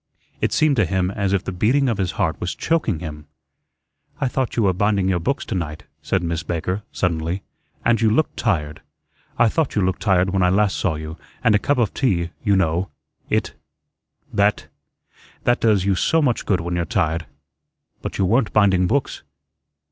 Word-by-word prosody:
It -, -, +1 dB
seemed 150 Hz, -3 st, +3 dB
to 110 Hz, -, +4 dB
him 95 Hz, +1 st, 0 dB
as 100 Hz, -1 st, -1 dB
if 100 Hz, -1 st, +1 dB
the -, -, -4 dB
beating 120 Hz, +10 st, +2 dB
of 115 Hz, -5 st, 0 dB
his 90 Hz, -2 st, -1 dB
heart 80 Hz, -, -1 dB
was 90 Hz, -, -2 dB
choking 135 Hz, -, 0 dB
him. 75 Hz, -3 st, -7 dB, 0.9 s
"I -, -, +1 dB
thought 130 Hz, 0 st, -2 dB
you 115 Hz, -, +2 dB
were 95 Hz, -2 st, +3 dB
binding 100 Hz, 0 st, +1 dB
your 95 Hz, -2 st, +1 dB
books 135 Hz, +12 st, -1 dB
to -, -, -4 dB
night," 80 Hz, -5 st, -4 dB, 0.2 s
said 95 Hz, -2 st, -1 dB
Miss 85 Hz, -1 st, -1 dB
Baker, 85 Hz, +5 st, -2 dB
suddenly, 85 Hz, +1 st, -1 dB, 0.4 s
"and 115 Hz, -1 st, +3 dB
you 110 Hz, -, +4 dB
looked 135 Hz, +9 st, +1 dB
tired. 80 Hz, -10 st, -1 dB, 0.6 s
I 120 Hz, -, +5 dB
thought 150 Hz, +5 st, 0 dB
you 105 Hz, -, +2 dB
looked 95 Hz, +1 st, -1 dB
tired 95 Hz, -2 st, +2 dB
when 95 Hz, 0 st, +1 dB
I 90 Hz, -, +4 dB
last 100 Hz, +1 st, +2 dB
saw 90 Hz, -5 st, 0 dB
you, 80 Hz, +1 st, -7 dB, 0.3 s
and -, -, +4 dB
a 105 Hz, -, +4 dB
cup 140 Hz, +6 st, +1 dB
of 115 Hz, -5 st, +1 dB
tea, 85 Hz, -10 st, 0 dB
you 100 Hz, -3 st, +3 dB
know, 90 Hz, 0 st, +1 dB, 0.4 s
it -, -, 0 dB, 0.8 s
that 100 Hz, +1 st, +2 dB, 0.8 s
that 120 Hz, -, +2 dB
does 105 Hz, -5 st, +3 dB
you 100 Hz, -, +3 dB
so 160 Hz, -, +2 dB
much 130 Hz, -7 st, 0 dB
good 95 Hz, -3 st, +2 dB
when 85 Hz, +1 st, -3 dB
you're 85 Hz, -1 st, 0 dB
tired. 80 Hz, 0 st, -1 dB, 0.7 s
But -, -, -5 dB
you 95 Hz, -, +2 dB
weren't 115 Hz, +4 st, +2 dB
binding 95 Hz, -3 st, +4 dB
books." 135 Hz, +6 st, -1 dB
95 Hz, 195 wpm, -21 LUFS, 85-110 Hz, 0.9 s, I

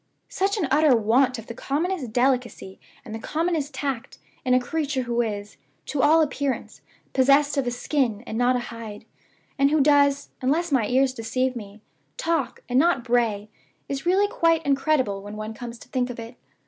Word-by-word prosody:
Such 395 Hz, +3 st, 0 dB
an 340 Hz, -8 st, 0 dB
utter 295 Hz, -2 st, +5 dB
want 245 Hz, +4 st, +2 dB
of 225 Hz, -, -9 dB
the 235 Hz, -, -7 dB
commonest 290 Hz, +1 st, -2 dB
delicacy 245 Hz, -5 st, 0 dB, 0.3 s
and 220 Hz, -, -8 dB
the 225 Hz, -, -5 dB
commonest 315 Hz, +2 st, -1 dB
tact, 270 Hz, -4 st, -4 dB, 0.3 s
in 255 Hz, -2 st, +3 dB
a -, -, +5 dB
creature 285 Hz, 0 st, -2 dB
who 240 Hz, 0 st, 0 dB
is, 210 Hz, -2 st, -4 dB, 0.3 s
to 270 Hz, 0 st, -1 dB
all 315 Hz, +2 st, +5 dB
appearance, 280 Hz, -2 st, -3 dB, 0.3 s
possessed 280 Hz, +3 st, +4 dB
of 275 Hz, -3 st, 0 dB
a -, -, +3 dB
skin, 245 Hz, -3 st, -1 dB
and 220 Hz, -, -6 dB
not 245 Hz, +2 st, +3 dB
a 240 Hz, -1 st, -4 dB
hide, 220 Hz, -3 st, -8 dB, 0.5 s
and 275 Hz, 0 st, +5 dB
who 310 Hz, +1 st, +2 dB
does, 285 Hz, -1 st, +3 dB
unless 310 Hz, +6 st, 0 dB
my 245 Hz, -6 st, +2 dB
ears 260 Hz, +2 st, +2 dB
deceive 255 Hz, +2 st, -1 dB
me, 210 Hz, -2 st, -9 dB, 0.4 s
talk, 330 Hz, -6 st, -1 dB
and 250 Hz, +1 st, +2 dB
not 330 Hz, -5 st, +3 dB
bray, 230 Hz, -4 st, +1 dB, 0.4 s
is 275 Hz, +4 st, -4 dB
really 390 Hz, +3 st, +4 dB
quite 330 Hz, -4 st, +1 dB
incredible 270 Hz, -7 st, +1 dB
when 205 Hz, +1 st, -8 dB
one 215 Hz, +1 st, -5 dB
comes 235 Hz, +1 st, -8 dB
to -, -, -15 dB
think 255 Hz, -1 st, -1 dB
of 245 Hz, -, -7 dB
it. 230 Hz, +2 st, -8 dB
260 Hz, 185 wpm, -24 LUFS, 235-290 Hz, 0.5 s, utter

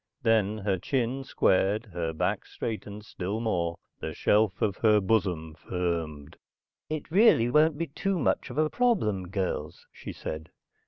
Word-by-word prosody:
Then 110 Hz, -2 st, +2 dB
her 100 Hz, -3 st, -1 dB
chin 130 Hz, +4 st, -1 dB
squared, 105 Hz, -2 st, +2 dB
her 85 Hz, -2 st, -2 dB
back 80 Hz, -, -1 dB
straightened 105 Hz, -2 st, -5 dB
still 100 Hz, +1 st, -4 dB
more, 85 Hz, -7 st, -1 dB, 0.2 s
the -, -, -5 dB
shelf 105 Hz, -2 st, +2 dB
of 100 Hz, -2 st, 0 dB
her 105 Hz, -2 st, +4 dB
bosom 95 Hz, -6 st, 0 dB
firmed. 80 Hz, -4 st, -4 dB, 0.5 s
"It 155 Hz, -1 st, -4 dB
really 170 Hz, -, +5 dB
won't 150 Hz, +2 st, +4 dB
be 170 Hz, -, -1 dB
too 190 Hz, +6 st, -2 dB
much 155 Hz, -, 0 dB
of -, -, -8 dB
a 155 Hz, 0 st, +3 dB
problem, 155 Hz, -, +1 dB
girls," 95 Hz, -1 st, -3 dB
she -, -, -8 dB
said. 80 Hz, +1 st, -6 dB
105 Hz, 150 wpm, -28 LUFS, 90-130 Hz, 0.5 s, really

